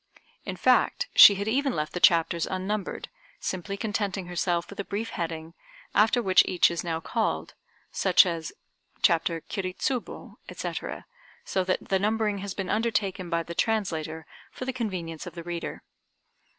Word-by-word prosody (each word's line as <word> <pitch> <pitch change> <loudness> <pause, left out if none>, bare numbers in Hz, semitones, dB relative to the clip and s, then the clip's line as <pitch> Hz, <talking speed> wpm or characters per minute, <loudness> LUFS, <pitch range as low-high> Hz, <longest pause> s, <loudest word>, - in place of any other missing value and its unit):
In - - -4
fact 485 +1 +2
she 200 - +10
had 200 +2 -3
even 270 +3 +1
left 150 0 -3
the 180 - -2
chapters 170 -1 +4
unnumbered, 190 +1 -3 0.3
simply 190 +2 -4
contenting 200 -3 -2
herself 175 -1 -1
with 200 - -11
a - - -1
brief 210 +4 -4
heading, 165 -1 -4 0.4
after 225 +3 +3
which 185 -2 +6
each 180 -2 +4
is 170 - -3
now 165 -2 -2
called, 225 +6 -2 0.4
such - - +5
as 165 -3 -3 0.5
"Chapter 165 -2 +2
Kiri 185 0 -4
Tsubo," 255 0 -4
etc., - - -5 0.4
so 190 - 0
that 185 - -2
the 190 - +2
numbering 210 0 0
has 195 -1 -5
been 195 -2 -3
undertaken 205 -5 -1
by 170 -1 0
the 170 - -7
translator 165 -7 -1 0.3
for 255 - -7
the 260 - -2
convenience 185 -10 -4
of - - -9
the 170 - -7
reader. 170 0 -5
190 Hz, 160 wpm, -27 LUFS, 170-210 Hz, 0.5 s, she